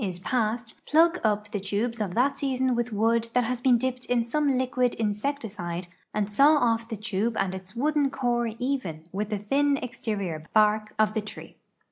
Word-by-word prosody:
EOXE 210 Hz, -, 0 dB
87 185 Hz, -, -4 dB
is -, -, -7 dB
passed, 225 Hz, -1 st, -1 dB
"plug 335 Hz, +3 st, +4 dB
up" 210 Hz, -1 st, 0 dB
the 205 Hz, -, -2 dB
tubes 215 Hz, +4 st, -2 dB
of 190 Hz, -4 st, -2 dB
that 275 Hz, +3 st, +2 dB
season 260 Hz, -2 st, +1 dB
with 240 Hz, 0 st, -1 dB
wood 230 Hz, +2 st, +1 dB
that 250 Hz, -, +4 dB
has 245 Hz, +1 st, -2 dB
been 250 Hz, -1 st, +5 dB
dipped 255 Hz, +1 st, -2 dB
in 240 Hz, -2 st, +1 dB
some 280 Hz, +1 st, +1 dB
liquid 255 Hz, -1 st, +1 dB
insecticide 205 Hz, -6 st, -3 dB, 0.2 s
and 210 Hz, -1 st, -1 dB
saw 290 Hz, +7 st, +5 dB
olVthe 230 Hz, -2 st, 0 dB
tu])e 215 Hz, +2 st, -1 dB
and 190 Hz, -1 st, 0 dB
its 190 Hz, +2 st, -9 dB
wooden 290 Hz, +2 st, +2 dB
core 240 Hz, -3 st, 0 dB
even 245 Hz, -, -2 dB
with 205 Hz, +2 st, -3 dB
the 210 Hz, -, -1 dB
thin 280 Hz, +8 st, +1 dB
exterior 205 Hz, -, -4 dB
l)ark 215 Hz, 0 st, +3 dB
of 215 Hz, 0 st, +3 dB
tlie 220 Hz, -1 st, -1 dB
tree. -, -, -10 dB
230 Hz, 190 wpm, -26 LUFS, 210-255 Hz, 0.2 s, been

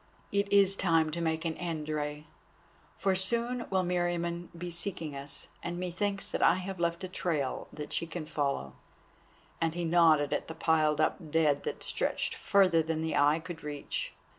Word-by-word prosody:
"It 200 Hz, 0 st, +1 dB
is 195 Hz, -1 st, +5 dB
time 165 Hz, -4 st, +2 dB
to 170 Hz, +2 st, -3 dB
make 160 Hz, 0 st, -1 dB
an 165 Hz, -, 0 dB
end, 165 Hz, -4 st, -3 dB
Rei, 150 Hz, 0 st, -3 dB, 0.7 s
for 195 Hz, -, +2 dB
soon 235 Hz, +6 st, 0 dB
will 190 Hz, -1 st, +2 dB
Meriamun 175 Hz, -1 st, -1 dB
be 175 Hz, +1 st, -5 dB
seeking 170 Hz, -4 st, -3 dB
us, 140 Hz, +1 st, -7 dB
and 175 Hz, +1 st, -4 dB
methinks 195 Hz, +3 st, -2 dB
that -, -, -2 dB
I -, -, +6 dB
have 185 Hz, 0 st, -5 dB
left 170 Hz, +2 st, 0 dB
a -, -, -2 dB
trail 155 Hz, -7 st, -2 dB
that 150 Hz, -1 st, -7 dB
she 165 Hz, -, 0 dB
can 165 Hz, -1 st, -5 dB
follow," 140 Hz, -, -2 dB, 0.9 s
and 165 Hz, 0 st, +1 dB
he 175 Hz, -1 st, -1 dB
nodded 160 Hz, -3 st, +4 dB
at -, -, -2 dB
the 160 Hz, -, -6 dB
piled 155 Hz, -2 st, +2 dB
up 155 Hz, -, +2 dB
dead 150 Hz, -2 st, +3 dB
that -, -, -4 dB
stretched -, -, -1 dB
further 185 Hz, -4 st, +4 dB
than 160 Hz, 0 st, -2 dB
the 160 Hz, -, -1 dB
eye 145 Hz, +2 st, +5 dB
could 170 Hz, 0 st, -8 dB
reach. 145 Hz, -1 st, -4 dB
165 Hz, 180 wpm, -31 LUFS, 155-180 Hz, 0.9 s, I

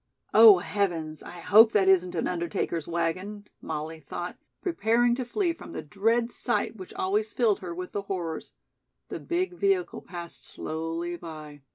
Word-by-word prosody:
"Oh, 220 Hz, -3 st, +10 dB
heavens, 170 Hz, -5 st, -2 dB
I 175 Hz, -1 st, -10 dB
hope 220 Hz, +5 st, +7 dB
that 195 Hz, -2 st, +3 dB
isn't 180 Hz, -2 st, +4 dB
an 165 Hz, -, 0 dB
undertaker's 170 Hz, -2 st, -2 dB
wagon," 185 Hz, +5 st, -2 dB, 0.2 s
Molly 160 Hz, +1 st, -5 dB
thought, 175 Hz, +4 st, -6 dB, 0.2 s
preparing 240 Hz, -, +2 dB
to 255 Hz, +1 st, -2 dB
flee 340 Hz, -, 0 dB
from 335 Hz, -, -11 dB
the -, -, -5 dB
dread 225 Hz, +8 st, +1 dB
sight 240 Hz, -2 st, -1 dB
which 185 Hz, -4 st, -10 dB
always 210 Hz, +3 st, 0 dB
filled 220 Hz, -4 st, +2 dB
her 175 Hz, -2 st, -6 dB
with 180 Hz, +1 st, -6 dB
the 205 Hz, -, -2 dB
horrors. 180 Hz, -5 st, -5 dB, 0.5 s
The -, -, -5 dB
big 360 Hz, +2 st, -1 dB
vehicle 380 Hz, 0 st, 0 dB
passed 175 Hz, -1 st, -8 dB
slowly 165 Hz, +2 st, -4 dB
by. 155 Hz, -3 st, -9 dB
185 Hz, 160 wpm, -27 LUFS, 170-225 Hz, 0.5 s, Oh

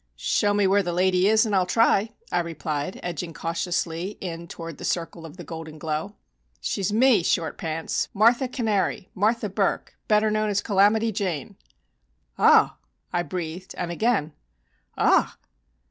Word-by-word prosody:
"Show 205 Hz, -, +1 dB
me 205 Hz, -1 st, +3 dB
where 195 Hz, +2 st, +4 dB
the 175 Hz, -2 st, -3 dB
lady 185 Hz, +1 st, +3 dB
is 220 Hz, +2 st, +4 dB
and 215 Hz, -, -2 dB
I'll 185 Hz, -1 st, +2 dB
try," 225 Hz, +1 st, +3 dB, 0.2 s
I -, -, +2 dB
replied, 160 Hz, -1 st, -4 dB
edging 170 Hz, -1 st, -4 dB
cautiously 170 Hz, +3 st, -2 dB
in 170 Hz, -2 st, -6 dB
toward 165 Hz, -2 st, -8 dB
the -, -, -8 dB
circle 165 Hz, -1 st, -3 dB
of 155 Hz, -, -13 dB
golden 160 Hz, 0 st, -8 dB
glow. 155 Hz, +6 st, -3 dB, 0.4 s
"She's 200 Hz, 0 st, -2 dB
me, 230 Hz, -1 st, +4 dB
Short 165 Hz, -1 st, 0 dB
Pants 160 Hz, 0 st, -3 dB
Martha 235 Hz, +5 st, +3 dB
Cannary 215 Hz, -7 st, -1 dB
Martha 215 Hz, +3 st, +1 dB
Burk, 195 Hz, 0 st, -1 dB
better 215 Hz, 0 st, +3 dB
known 215 Hz, 0 st, 0 dB
as 200 Hz, -1 st, +1 dB
'Calamity 215 Hz, +2 st, +3 dB
Jane.'" 185 Hz, -8 st, -3 dB, 0.8 s
"Ah!" -, -, +5 dB, 0.4 s
I 175 Hz, -, +2 dB
breathed, 175 Hz, 0 st, -6 dB
and 175 Hz, -1 st, -3 dB
again 175 Hz, -5 st, 0 dB, 0.6 s
"Ah!" -, -, +3 dB
185 Hz, 145 wpm, -25 LUFS, 165-210 Hz, 0.8 s, Ah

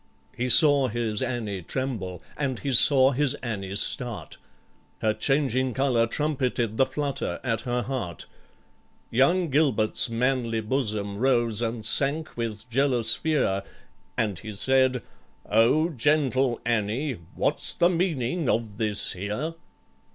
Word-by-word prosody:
He 125 Hz, +1 st, -2 dB
saw 145 Hz, 0 st, +5 dB
his 115 Hz, -2 st, -2 dB
ANNIE 115 Hz, -7 st, -3 dB
tremble 95 Hz, -4 st, -4 dB
and 135 Hz, -4 st, -2 dB
he 140 Hz, +2 st, -3 dB
saw 130 Hz, +2 st, +7 dB
his 145 Hz, +1 st, 0 dB
ANNIE 100 Hz, -5 st, -4 dB
start, 120 Hz, +1 st, -2 dB, 0.7 s
Her 110 Hz, -1 st, +2 dB
changing 130 Hz, -1 st, 0 dB
colour 125 Hz, -4 st, +2 dB
trumpeted 125 Hz, -5 st, -1 dB
the 135 Hz, -, +3 dB
flutter 140 Hz, +1 st, -3 dB
at 115 Hz, -3 st, -1 dB
her 120 Hz, 0 st, 0 dB
heart; 115 Hz, -9 st, -5 dB, 0.9 s
Young 165 Hz, +7 st, +2 dB
GILBERT'S 130 Hz, -6 st, +2 dB
manly 115 Hz, -1 st, 0 dB
bosom 105 Hz, -4 st, -2 dB
rose 120 Hz, -3 st, +2 dB
and 115 Hz, -1 st, -3 dB
sank 145 Hz, +7 st, 0 dB
with 110 Hz, -2 st, -5 dB
jealous 120 Hz, -2 st, +2 dB
fear, 135 Hz, -12 st, 0 dB, 0.6 s
And 100 Hz, -6 st, -1 dB
he 110 Hz, +3 st, -8 dB
said, 130 Hz, +3 st, +2 dB, 0.4 s
"O 115 Hz, +10 st, +3 dB
gentle 135 Hz, -3 st, +1 dB
ANNIE, 120 Hz, -, -1 dB, 0.2 s
what's -, -, 0 dB
the 175 Hz, -, +3 dB
meaning 165 Hz, -4 st, -1 dB
of 110 Hz, -3 st, -1 dB
this 105 Hz, -2 st, 0 dB
here?" 105 Hz, -, -4 dB
125 Hz, 125 wpm, -25 LUFS, 110-135 Hz, 0.9 s, saw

